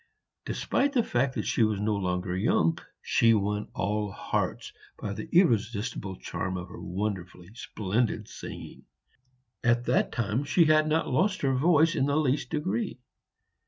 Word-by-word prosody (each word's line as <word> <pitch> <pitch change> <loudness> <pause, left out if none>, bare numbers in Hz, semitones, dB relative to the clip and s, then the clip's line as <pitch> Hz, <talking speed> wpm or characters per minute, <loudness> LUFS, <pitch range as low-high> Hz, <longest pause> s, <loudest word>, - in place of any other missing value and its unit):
Despite 280 +1 0
the 245 -4 +3
fact 130 - 0
that - - -2
she - - 0
was 110 -2 +2
no 105 +1 0
longer 90 -1 -2
young, 85 -4 +2 0.2
she 115 -1 +4
won 105 0 -1
all 105 +2 -1
hearts - - -3 0.2
by 100 - -4
the 160 - -7
irresistible 115 - +1
charm 95 0 -4
of 90 0 -7
her - - -10
wonderfully 90 -1 -4
splendid 110 0 -2
singing. - - -9 0.8
At 120 0 +2
that - - +2
time 115 +3 -1
she 165 +4 +3
had 155 0 +4
not 160 +1 +1
lost 190 +10 +1
her 135 -1 +2
voice 160 +4 +4
in 135 - +1
the 145 +1 +1
least 145 -2 +1
degree. 120 -7 -2
115 Hz, 155 wpm, -28 LUFS, 100-145 Hz, 0.8 s, she